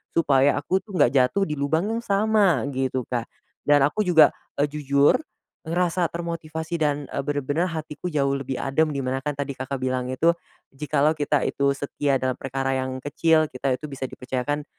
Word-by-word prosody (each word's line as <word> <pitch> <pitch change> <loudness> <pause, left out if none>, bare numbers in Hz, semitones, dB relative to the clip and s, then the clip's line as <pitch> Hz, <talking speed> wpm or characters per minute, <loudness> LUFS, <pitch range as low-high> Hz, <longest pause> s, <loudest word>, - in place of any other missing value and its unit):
supaya 140 -3 +4
aku 180 +6 0
tuh 200 -2 -10
nggak 125 - +4
jatuh 135 +8 +3
di 150 - -2
lubang 160 +7 +1
yang 230 - -1
sama," 200 - +3
gitu, 130 -1 -1
Kak. 120 -2 -2 0.4
Dan 145 -1 +5
aku 210 +10 +1
juga, 160 -4 +7 0.3
eee, 145 - +3
jujur 140 -1 +3 0.5
ngerasa 175 +1 0
termotivasi 165 -1 -4
dan, 145 -1 0
eee, 140 - -2
bener-bener 145 +3 -1
hatiku 155 +1 -5
jauh 140 -3 +1
lebih 135 -1 -4
adem, 155 +4 +1
di 140 - -3
mana 130 +1 -2
kan 150 0 -1
tadi 140 -1 -3
Kakak 130 +1 -4
bilang 130 -1 -1
itu, 165 +6 +3 0.4
"Jikalau 150 +2 +1
kita 145 -2 0
itu 140 0 +1
setia 140 -1 0
dalam 130 0 0
perkara 135 0 -2
yang 130 0 -2
kecil, 155 +3 +2
kita 130 0 -1
itu 150 - -7
bisa 135 - -6
dipercayakan 135 +3 -3
145 Hz, 180 wpm, -24 LUFS, 135-160 Hz, 0.5 s, juga